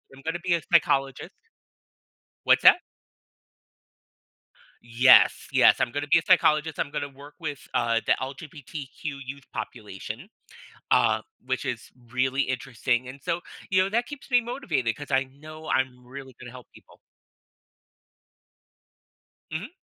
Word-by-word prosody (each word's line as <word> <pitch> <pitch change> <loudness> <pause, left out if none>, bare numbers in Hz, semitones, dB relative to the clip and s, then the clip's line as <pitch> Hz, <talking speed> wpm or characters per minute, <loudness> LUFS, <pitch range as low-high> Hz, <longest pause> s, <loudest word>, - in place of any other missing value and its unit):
I'm 135 - -15
gonna 165 +2 -2
be 180 -2 +1
a 170 - -2
psychologist. 135 +1 +2 1.1
What's - - +4
that? - - +9 2.1
Yes, 120 +2 +5
yes, - - +5
I'm 120 - +1
gonna 145 +1 -3
be 165 - +5
a - - -5
psychologist. 155 -2 +3
I'm - - -1
gonna 145 -1 -4
work 140 +2 -14
with 150 -5 -6
the 115 -1 +2
LGBTQ 140 0 -8 0.2
youth 140 +1 -8
population, 110 - -7 0.6
uh, - - +3 0.2
which - - -2
is - - -5 0.2
really 130 +2 +1
interesting, 125 -1 -1
and 135 +1 -11
so, 170 +3 -1 0.3
you 185 0 +4
know, 190 - 0
that 235 +2 0
keeps 290 -2 -10
me 245 -1 +5
motivated 240 - -2
'cause 145 -1 -9
I 135 +1 +3
know 155 +4 -12
I'm 130 -1 -1
really 130 -1 -10
gonna 120 - -9
help 125 0 -12
people. - - -19 2.5
Mhm. 165 - -4
140 Hz, 135 wpm, -26 LUFS, 130-160 Hz, 2.5 s, that